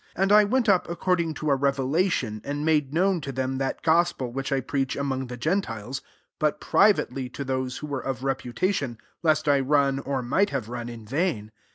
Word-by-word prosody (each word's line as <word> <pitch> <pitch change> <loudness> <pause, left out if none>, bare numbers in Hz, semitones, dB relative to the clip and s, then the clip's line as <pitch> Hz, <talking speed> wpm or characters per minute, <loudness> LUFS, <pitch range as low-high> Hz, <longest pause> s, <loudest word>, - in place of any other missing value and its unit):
2 - - -4
And 195 - +2
I 210 0 +7
went 245 +3 +1
up 190 -4 +3
according 170 -2 0
to 155 -1 -1
a - - +5
revelation, 135 - 0
and 145 +1 -3
made 150 -4 +2
known 180 +2 +2
to 140 -1 -5
them 130 0 -2
that 135 -1 -2
gos 170 +2 +4
pel 125 -2 -5
which 135 +2 -4
I 135 - +2
preach 135 +1 -2
among 135 -2 -2
the 125 0 -7
gentiles; 135 - -2 0.4
but 150 -1 +1
privately 135 - +2
to 140 - -6
those 130 -1 -2
who - - -6
were 140 -3 -4
of 130 -1 -4
reputation, 135 - -1 0.2
lest 155 -2 +2
I 140 -1 +4
run, 135 0 +2
or 135 -2 -2
might 165 +12 +2
have 130 -6 -3
run, 120 -1 -5
in 115 -2 -9
vain. 135 - -1
140 Hz, 205 wpm, -26 LUFS, 130-165 Hz, 0.4 s, I